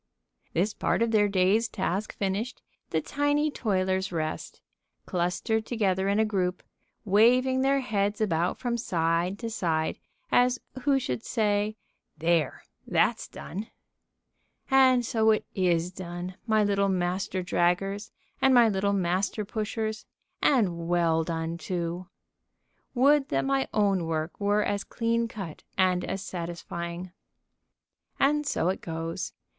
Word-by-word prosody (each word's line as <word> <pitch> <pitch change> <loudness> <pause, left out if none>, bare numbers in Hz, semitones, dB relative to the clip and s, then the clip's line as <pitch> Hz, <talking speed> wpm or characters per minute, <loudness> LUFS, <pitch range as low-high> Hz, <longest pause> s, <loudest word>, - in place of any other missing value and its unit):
This 195 +5 +1
part - - +1
of 230 - 0
their 210 -2 +4
day's 200 +4 +3
task 200 -1 -3
finished, 205 +5 -2 0.3
the 160 - 0
tiny 290 - +1
toilers 190 -5 0
rest, 155 -2 -4 0.5
clustered 185 +5 -1
together 195 -5 +1
in 200 - +2
a 220 - +4
group, 185 -4 -1 0.4
waving 250 +6 +4
their 275 +1 +3
heads 205 -4 -1
about 175 -4 +1
from 240 -2 -2
side 170 -1 0
to 230 +1 -4
side, 160 -6 -1 0.3
as 250 0 +4 0.2
who 280 0 +3
should 125 - -3
say: 210 -2 0 0.4
"There 165 -2 +1 0.2
that's - - +1
done!" 205 +5 -7 1.0
And 260 -2 +5
so 220 -2 +2
it 215 - +2
is 175 -2 +1
done, 180 0 -6
my 215 -1 +3
little 200 -1 +2
Master 185 0 -1
Draggers 195 +4 0 0.3
and 265 -1 +5
my 240 -2 +7
little 200 -1 +1
Master 190 +3 0
Pushers, 220 0 -3 0.3
and 180 - +2
well 170 -2 +2
done, 165 0 -3
too. 175 0 -3 0.9
Would 275 +3 +4
that 135 0 0
my 135 0 +1
own 195 -5 +2
work 160 0 -3
were 205 +1 +2
as 200 -1 -1
clean 230 0 0
cut 195 -8 -7 0.2
and 185 -1 +3
as 195 +1 -3
satisfying. 170 0 -5 1.1
And 295 +1 +2
so 180 - +1
it 190 - -2
goes. 165 0 -4
195 Hz, 130 wpm, -27 LUFS, 175-220 Hz, 1.1 s, my